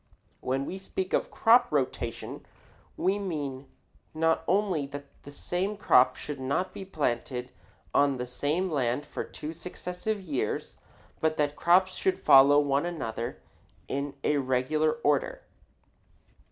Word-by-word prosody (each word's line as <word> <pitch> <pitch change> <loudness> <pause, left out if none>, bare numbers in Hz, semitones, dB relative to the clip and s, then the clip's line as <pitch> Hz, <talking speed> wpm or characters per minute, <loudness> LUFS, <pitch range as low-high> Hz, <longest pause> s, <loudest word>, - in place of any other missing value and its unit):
When 135 +2 -1
we 190 - -5
speak 190 0 -4
of - - +1
crop 240 +2 +4
rotation 130 -5 -2 0.5
we 195 +3 +1
mean 145 -8 -4 0.5
not 160 0 +2
only 185 -7 +1
that 145 0 -8 0.2
the - - -11
same 180 +8 -2
crop 130 -10 +5
should 150 -2 -6
not 140 +8 -1
be - - -7
planted 125 -6 -2 0.4
on 140 -2 +3
the 125 - -3
same 150 +9 -1
land 135 -1 0
for - - -5
two 155 +2 -7
successive 180 +5 -4
years 145 - -3 0.4
but 155 0 +1
that 145 -1 0
crops 185 +3 +4
should 190 0 0
follow 140 +2 +7
one 140 +2 +1
another 120 -8 -4 0.4
in 140 0 -3
a 150 - +2
regular 135 +4 +1
order. - - +1
150 Hz, 135 wpm, -28 LUFS, 135-180 Hz, 0.5 s, follow